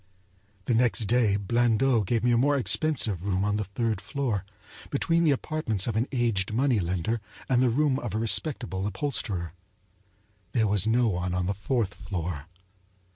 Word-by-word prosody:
The 125 - +1
next 120 0 +2
day 115 -2 +2
Blandot 115 +2 +2
gave 115 +2 0
me 120 - +3
a - - +4
more 140 +4 +3
expensive 115 - +1
room 95 0 0
on 105 0 0
the 105 - -2
third 105 +1 -2
floor, 125 -9 -2 0.5
between 165 +4 +1
the - - +4
apartments 135 -8 0
of 115 - -2
an 115 +4 +1
aged 115 -7 0
money 125 -1 +2
lender 95 +5 -1 0.3
and 125 -1 +3
the 130 - +4
room 140 +2 +1
of 105 - -5
a - - +1
respectable 105 -2 0
upholsterer. 100 - -2 1.0
There 115 -3 +2
was 105 0 +1
no 120 +2 +3
one 90 -2 -1
on 90 0 0
the 100 - 0
fourth 105 +1 -1
floor. 90 -6 -5
110 Hz, 170 wpm, -27 LUFS, 95-125 Hz, 1.0 s, a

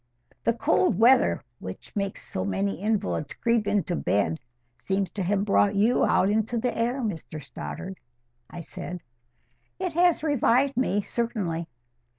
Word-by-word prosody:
"The 230 - +3
cold 225 - +2
weather, 245 +5 +5 0.2
which - - -9
makes 200 -1 -3
so 95 - -3
many 100 - -1
invalids 205 -8 -1
creep 230 -3 +1
into 205 -3 +1
bed, 100 - 0 0.4
seems 190 +9 -2
to 205 - -4
have 195 +2 +1
brought 205 0 +3
you 220 +5 +3
out 190 - +3
into 220 +3 0
the 235 0 -1
air, 240 +4 0
Mr 165 -7 -4
Stoddart," 185 +6 -7 0.5
I 175 - -7
said. 180 +1 -7 0.8
"It 365 -3 -3
has 345 -1 +3
revived 275 -2 +2
me, 205 -5 +1
certainly." 195 -10 -2
205 Hz, 145 wpm, -26 LUFS, 175-235 Hz, 0.8 s, weather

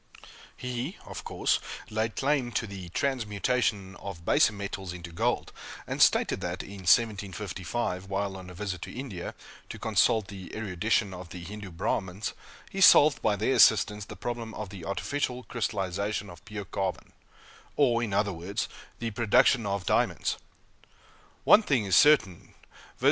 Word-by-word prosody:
He, 125 +6 -4
of - - -7
course, - - +1 0.3
laid 110 +1 -1
claim 135 -3 +1
to - - 0
the 95 -4 -8
transmutation 105 -3 -1
of 90 -4 -8
baser - - +4
metals 100 -3 -5
into 85 -1 -8
gold, 85 - -1 0.3
and - - -3
stated - - +4
that, - - -3
in 100 - -10
1755, 100 -2 0
while 100 0 -2
on 95 -1 -9
a 90 - -11
visit 95 -2 -4
to - - -6
India, 120 -9 -6 0.3
to - - -7
consult 110 -4 +2
the 95 -3 -9
erudition 105 0 0
of 90 -1 -9
the 90 -1 -8
Hindoo 100 +2 -7
Brahmins, 95 +3 -2 0.4
he 195 - -3
solved, 150 -4 +7
by 105 - +2
their 110 +6 +1
assistance, 105 -3 +5
the 105 - -9
problem 115 +2 -5
of 105 -3 -5
the 95 -4 -9
artificial 125 - -2
crystallization 100 -3 -2
of 85 +2 -14
pure 105 -2 -6
carbon 95 0 -3 0.6
or, 120 -5 +3
in 115 -4 -2
other 100 0 +1
words, 95 +7 -3 0.3
the 115 -1 -3
production 115 +1 +3
of 100 -2 -2
diamonds! - - +1 1.0
One 215 - +7
thing 135 - +1
is 95 -2 +2
certain, 140 - +4 0.3
viz. - - -26
100 Hz, 155 wpm, -28 LUFS, 95-120 Hz, 1.0 s, solved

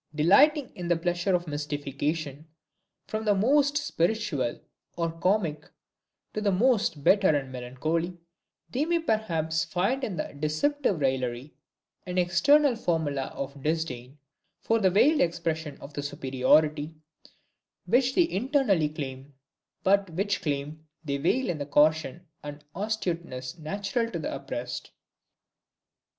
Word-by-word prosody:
Delighting 265 - +4
in 175 -1 -6
the 175 - +3
pleasure 175 +2 0
of 175 -1 -2
mystification, 145 +1 -3 0.6
from 215 0 -4
the 210 -2 +3
most 285 +7 +3
spiritual 175 - -1 0.4
or 165 -1 0
comic 165 -3 -1 0.6
to 215 - -2
the 205 -1 +2
most 205 - +2
bitter 195 +3 +5
and 140 -4 +1
melancholy, 155 +8 -3 0.5
they 265 +4 0
may 340 +1 +2
perhaps 170 - 0
find 200 - -1
in 205 -7 -2
this 155 - -4
deceptive 190 - 0
raillery 130 0 -1 0.5
an 180 0 -3
external 275 +11 +4
formula 160 - -1
of 140 +1 -7
disdain 150 -4 -3 0.4
for 225 0 +1
the 190 -3 +4
veiled 275 - +4
expression 160 -3 -1
of 145 - -11
the 145 - -3
superiority 145 +2 +1 0.9
which 255 +2 +2
they 350 -2 +4
internally 225 - +1
claim, 135 -2 -7 0.5
but 195 0 +3
which 195 +5 -1
claim 150 +1 -3 0.2
they 140 -1 -1
veil 210 - +1
with 170 -4 -2
the 145 - -3
caution 155 +3 +2 0.2
and 145 0 -8
astuteness 170 -10 -3
natural 200 +8 -2
to 180 - -4
the 155 - -4
oppressed. 130 -3 -5
165 Hz, 130 wpm, -27 LUFS, 145-210 Hz, 0.9 s, bitter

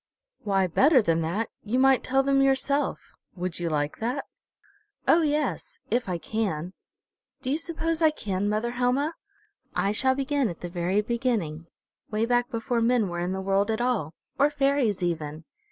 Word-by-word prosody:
"Why, 195 -2 +1
better 265 - +5
than 165 -7 +1
that, 190 +8 -2
you 220 +4 -1
might 265 0 +4
tell 270 +1 +2
them 275 0 +3
yourself. 275 +1 0 0.2
Would 180 -1 -3
you 170 -1 -1
like 150 -1 -1
that?" 250 +5 -2 0.8
"Oh, 335 - +6
yes 305 +10 -1
if 240 -4 0
I 180 - -1
can. 185 -4 -3 0.7
Do 260 - -1
you 300 - +1
suppose 330 0 -2
I 320 - +6
can, 205 -9 -2
mother 215 +3 0
Helma? 250 +6 +1 0.6
I 200 - +1
shall 260 +5 +2
begin 275 -2 0
at 170 - -8
the 175 - -5
very 180 +3 0
beginning, 210 -10 -1 0.4
way 215 +1 0
back 245 +1 +1
before 235 0 -1
men 230 -3 +2
were 175 0 -4
in 175 +1 -1
the 190 0 -2
world 195 +2 +1
at 220 0 0
all, 230 -11 -1 0.2
or 285 +2 +5
fairies 275 -9 +1
even. 160 -2 -3
230 Hz, 170 wpm, -26 LUFS, 185-270 Hz, 0.8 s, Oh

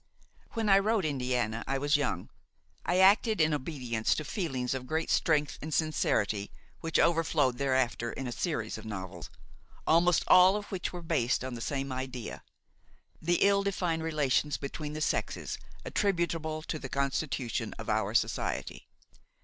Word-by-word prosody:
When 225 -2 -1
I 195 -1 +7
wrote 210 -1 +1
Indiana, 125 -5 -1
I 135 - 0
was 145 +2 +2
young; 130 -11 -1 0.6
I 175 - +2
acted 205 +3 +5
in 155 -1 +4
obedience 130 -6 -1
to 155 - -4
feelings 135 - -2
of 130 -1 -5
great 160 +2 -1
strength 150 -3 +2
and 155 - -5
sincerity 110 -10 +1 0.3
which 165 -1 -1
overflowed 160 -6 +2
thereafter 130 -4 +1
in 135 - -5
a 125 - -3
series 115 - -2
of 110 - -11
novels, 95 -5 -6 0.6
almost 170 +2 +4
all 185 +2 +7
of 210 -1 -3
which 190 -2 -3
were 175 -1 -7
based 135 -8 +1
on 130 -1 -4
the 120 - -6
same 135 +1 -2
idea: 130 -2 -5 0.8
the 175 +2 +2
ill 200 0 +4
defined 180 -4 -1
relations 150 -2 +1
between 150 +2 -5
the 155 - -5
sexes, - - -1 0.3
attributable 170 -5 -1
to 155 - -4
the 135 - -7
constitution 135 -2 -2
of - - -8
our - - 0
society. - - -1
150 Hz, 155 wpm, -30 LUFS, 130-170 Hz, 0.8 s, I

